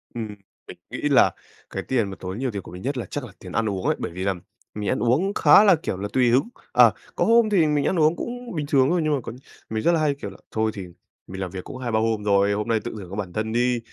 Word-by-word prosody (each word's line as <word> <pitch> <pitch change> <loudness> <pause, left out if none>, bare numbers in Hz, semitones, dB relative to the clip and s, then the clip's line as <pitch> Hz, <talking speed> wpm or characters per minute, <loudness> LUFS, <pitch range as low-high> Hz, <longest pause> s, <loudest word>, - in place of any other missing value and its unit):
Ừm, 110 -3 -5 0.3
mình - - -10
nghĩ - - -6
là - - +5 0.4
cái - - -4
tiền 115 -6 0
mà 95 - -7
tốn 95 +2 -5
nhiều 130 -2 -1
tiền 100 -2 -4
của - - -12
mình 90 +1 -9
nhất 135 +2 -2
là 120 - -3
chắc 145 - -5
là 115 - -11
tiền 90 - -10
ăn 110 0 0
uống 95 -2 -4
ấy, - - +2
bởi - - -4
vì 95 +2 -5
là 100 -1 +1 0.4
mình 105 -2 -3
ăn - - 0
uống 140 - +1
khá 210 - +7
là, 195 -4 +6
kiểu 155 - -4
là, 100 +2 -3
tùy 125 -2 +3
hứng. 130 - +3 0.2
Ờ, - - +7 0.2
có - - +1
hôm 230 -1 +5
thì 175 -7 +3
mình 150 -1 +1
ăn 180 - +1
uống 155 +2 +4
cũng 245 -4 -6
bình 150 -2 -2
thường 135 -2 +4
thôi 175 -1 +2
nhưng 155 -1 +1
mà 135 - -3
có - - -6 0.4
mình 110 0 -2
rất 170 - +4
là 165 - +2
hay 145 -2 +1
kiểu - - -7
là: - - -13
"Thôi 110 0 0
thì 95 -4 -6 0.4
mình 95 +1 -7
làm 90 -2 -4
việc 95 -1 -6
cũng - - -8
2-3 120 -4 -1
hôm 110 -2 0
rồi, 100 0 +3
hôm 105 +2 -2
nay 115 -1 +2
tự 120 - -4
thưởng 95 -4 -9
cho 100 - -7
bản 95 -4 -5
thân 110 +1 -2
đi." 120 0 +2
115 Hz, 295 wpm, -24 LUFS, 100-145 Hz, 0.4 s, khá